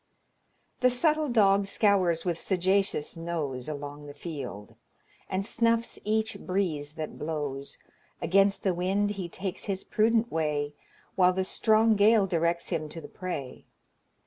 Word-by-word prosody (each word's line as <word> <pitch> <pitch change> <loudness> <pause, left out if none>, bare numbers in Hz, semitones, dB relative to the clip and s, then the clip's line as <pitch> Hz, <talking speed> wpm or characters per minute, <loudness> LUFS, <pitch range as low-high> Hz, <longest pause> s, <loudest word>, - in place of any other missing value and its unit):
"The 255 - +5
subtle 305 +4 +2
dog 200 -4 +4
scours 190 -6 +2
with 170 -2 -1
sagacious 190 -4 0
nose 155 -6 -3
Along 145 0 -7
the 145 - -10
field, 135 - -7 0.6
and 190 +1 -1
snuffs 230 +1 0
each 220 +1 0
breeze 165 -6 -2
that 155 -1 -6
blows; 145 -3 -4 0.4
Against 195 +2 +3
the 190 - +2
wind 195 +4 0
he 190 -4 -5
takes 190 +1 -4
his 195 -2 -2
prudent 225 +2 +2
way, 150 -2 -1 0.4
While 185 -1 +4
the 190 +1 0
strong 220 +3 +3
gale 210 0 +5
directs 170 -1 0
him 155 -4 -2
to 165 - -7
the 160 - -9
prey. 160 -8 -6
185 Hz, 140 wpm, -28 LUFS, 155-205 Hz, 0.6 s, The